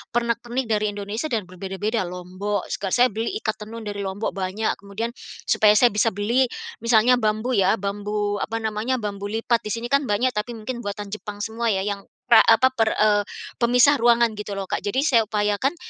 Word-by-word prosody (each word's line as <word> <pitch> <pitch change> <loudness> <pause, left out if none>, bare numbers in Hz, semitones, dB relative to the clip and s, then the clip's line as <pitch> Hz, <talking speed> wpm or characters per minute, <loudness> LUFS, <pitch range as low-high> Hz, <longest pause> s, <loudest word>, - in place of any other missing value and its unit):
pernak 235 -1 +1
pernik 240 -1 -3
dari 210 0 +1
Indonesia 205 +8 -4
dan 225 -7 -1
berbeda-beda, 190 +3 -3
Lombok 185 +3 -4
seka 195 - -3
saya 250 +1 +4
beli 225 +3 -3
ikat 215 0 -2
tenun 225 +2 -8
dari 205 -1 -5
Lombok 200 +2 -3
banyak, 195 +3 -2
kemudian 205 +4 -5 0.3
supaya 210 -1 +4
saya 240 +1 +5
bisa 210 +2 +1
beli 235 +6 +2 0.3
misalnya 235 +2 +4
bambu 215 +3 0
ya, 195 -4 +3
bambu, 205 0 -2
apa 225 +2 -3
namanya, 220 +4 -1
bambu 205 -3 -4
lipat 225 +2 0
di - - -4
sini 235 +2 -6
kan 280 -1 +2
banyak 240 +5 +1
tapi 230 +2 -4
mungkin 235 +3 -5
buatan 205 -2 -6
Jepang 210 -1 -6
semua 225 +2 -2
ya 190 -3 +1
yang 200 -1 -4 0.2
pra 225 - +9
apa, 240 +3 +5
per, 225 -4 +1
eee, 210 -1 +3 0.4
pemisah 250 +4 +4
ruangan 235 -1 +4
gitu 205 -1 -5
loh, 195 - -3
Kak. - - -1
Jadi 225 +8 -1
saya 235 -8 +3
upayakan 210 +7 0
215 Hz, 195 wpm, -23 LUFS, 205-235 Hz, 0.4 s, pra